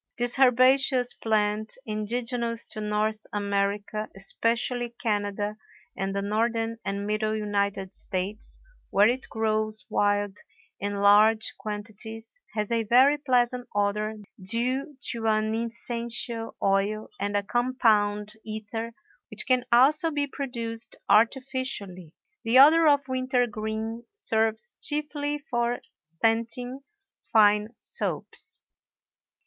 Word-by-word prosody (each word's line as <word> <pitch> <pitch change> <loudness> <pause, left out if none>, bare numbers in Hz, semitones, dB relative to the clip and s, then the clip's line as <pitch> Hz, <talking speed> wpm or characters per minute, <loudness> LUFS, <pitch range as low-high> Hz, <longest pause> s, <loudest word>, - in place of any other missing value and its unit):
This 245 +2 0
herbaceous 255 0 +4
plant, 215 -1 0
indigenous 230 +2 -2
to 215 - -5
North 210 +1 -1
America, 205 +1 -1
especially 235 +4 -1
Canada 205 -1 -1 0.4
and 195 +1 -2
the 200 - -1
Northern 225 +2 0
and 200 +1 -3
Middle 215 +1 0
United 200 -2 -1
States, 190 +3 -4 0.3
where 205 +2 +5
it 255 +3 -1
grows 215 -1 -1
wild 205 -1 +1 0.4
in 205 +1 -2
large 210 +2 +5
quantities, 220 - -6 0.2
has 210 0 -1
a 230 -1 +2
very 260 +7 +5
pleasant 250 -3 +1
odor 210 +1 0 0.3
due 255 - -1
to 225 -1 -3
an 215 0 +2
essential 230 0 -3
oil 200 +2 +1
and 205 +1 0
a 200 - 0
compound 210 -3 +1
ether 220 +1 -5 0.4
which 215 - -6
can 255 -1 +3
also 295 +7 +5
be 290 -2 0
produced 235 -5 -5
artificially. 225 - 0 0.3
The 230 +2 +3
odor 315 +4 +8
of 285 -2 +4
wintergreen 235 -3 -1
serves 220 -1 -1
chiefly 295 -1 -2
for 240 -5 -1 0.2
scenting 230 - -1 0.5
fine 210 +1 +4
soaps. 475 - -4
225 Hz, 110 wpm, -27 LUFS, 210-245 Hz, 0.5 s, odor